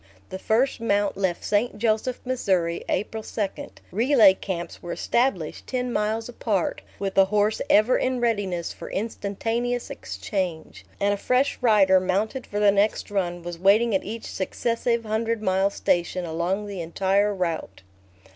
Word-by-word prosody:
The 190 - -6
first 235 +7 +1
mount 205 -3 +1
left 190 -3 -1
St. 210 +2 0
Joseph, 225 +3 0
Missouri, 190 -10 0
April 220 +3 -2
2; 210 -1 -2 0.4
relay 225 -1 +5
camps 175 -3 -5
were 175 - -6
established 235 - -1
ten 250 -1 -2
miles 220 +2 -1
apart, 215 -6 -1 0.2
with 195 -1 -3
a 195 - +7
horse 210 +2 +1
ever 215 +5 +5
in 255 -1 0
readiness 205 -8 -1
for 170 - -9
instantaneous 230 +4 -2
exchange, 180 -6 -4
and 200 0 +2
a - - -2
fresh 255 +6 +1
rider, 200 -5 +5
mounted 205 +7 -1
for 205 - -3
the 205 -1 +5
next 205 +1 +1
run, 175 -3 -2
was 175 -1 -6
waiting 210 +5 +4
at 190 - +1
each 220 +2 -6
successive 230 +4 -1
hundred 220 +1 -1
mile 190 0 +2
station 175 -2 0
along 170 +5 -2
the 200 -3 -5
entire 195 +5 +1
route. 170 - -3
205 Hz, 150 wpm, -25 LUFS, 190-230 Hz, 0.4 s, a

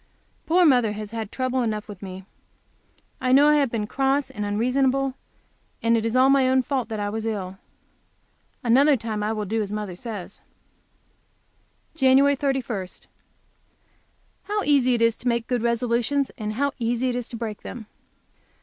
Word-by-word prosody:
Poor 350 +2 +4
mother 245 -8 +4
has 210 0 -7
had 225 -3 -5
trouble 255 0 -1
enough 215 -3 -2
with 205 -4 -10
me; 190 -1 -8 1.0
I 255 - +1
know 285 +3 +6
I 300 - +5
have 280 -3 +2
been 225 -2 -2
cross 270 +4 0
and 210 -5 -5
unreasonable, 260 +6 +1 0.7
and 230 0 +3
it 225 - 0
was 230 +1 -1
all 260 +1 +5
my 270 -1 +4
own 260 0 +3
fault 260 -3 -2
that 220 -1 -4
I 205 - -1
was 220 +1 -4
ill. 195 -4 -4 1.0
Another 270 +4 +5
time 220 -2 -4
I 210 +1 -1
will 215 -1 -3
do 220 +3 -1
as 205 -1 -4
mother 210 -4 -4
says. 205 -2 -7 1.5
JAN. 275 -1 +4
31. 260 -8 -2 1.6
How 415 0 -1
easy 260 -4 +3
it 230 - +1
is 230 -1 +3
to 250 - -6
make 235 -1 +1
good 245 -1 -1
resolutions, 240 +4 0
and 215 -4 -4
how 280 +5 0
easy 240 +2 0
it 245 - -2
is 245 -2 -4
to - - -7
break 220 -3 -5
them! 230 -3 -8
235 Hz, 170 wpm, -24 LUFS, 215-265 Hz, 1.6 s, know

